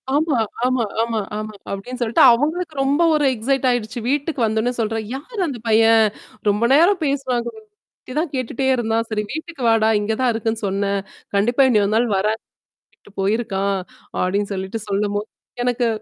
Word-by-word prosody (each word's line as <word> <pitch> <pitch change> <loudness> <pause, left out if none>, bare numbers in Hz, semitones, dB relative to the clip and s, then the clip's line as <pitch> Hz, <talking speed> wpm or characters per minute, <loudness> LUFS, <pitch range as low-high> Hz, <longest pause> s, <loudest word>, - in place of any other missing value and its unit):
ஆமா, 300 -4 +2 0.3
ஆமா, 255 -2 +1 0.2
ஆமா, 230 -1 0 0.2
ஆமா. 215 0 -5 0.2
அப்பிடின்னு 245 +6 -5
சொல்லிட்டு 230 -1 +3
அவுங்களுக்கு 310 +7 +1
ரொம்ப 285 +5 +2
ஒரு 295 - +2
எக்ஸைட் 265 +3 0
ஆயிடுச்சு 240 0 -1
வீட்டுக்கு 285 -1 -1
வந்தோன்னே 220 +3 0
சொல்றா. 225 0 0 0.2
"யாரு 415 - -9
அந்த 260 -6 -5
பையன்? 225 0 +5 0.4
ரொம்ப 210 +3 +1
நேரம் 345 +4 +4
பேசுறாங்க? 255 -4 -1 0.6
இதான் 305 +3 -1
கேட்டுட்டே 255 +1 -2
இருந்தான். 230 -1 0
சரி 210 -1 -1
வீட்டுக்கு 320 -1 -7
வாடா! 220 -1 +4
இங்க 220 +2 -1
தான் 250 -2 +3
இருக்குன்னு 225 0 -2
சொன்னேன்" 200 +1 0 0.4
"கண்டிப்பா 240 +7 +3
இன்னியொரு 210 -2 +2
நாள் 240 +1 +3
வரேன், 215 +3 +1 0.4
அப்பிடின்ட்டு 205 - -24
போயிருக்கான்" 200 -2 0 0.4
அப்பிடின்னு 200 +2 0
சொல்லிட்டு 190 +4 -4
சொல்லும்போது, 205 +1 -1 0.4
எனக்கு 245 -1 +1
230 Hz, 150 wpm, -21 LUFS, 215-270 Hz, 0.6 s, பையன்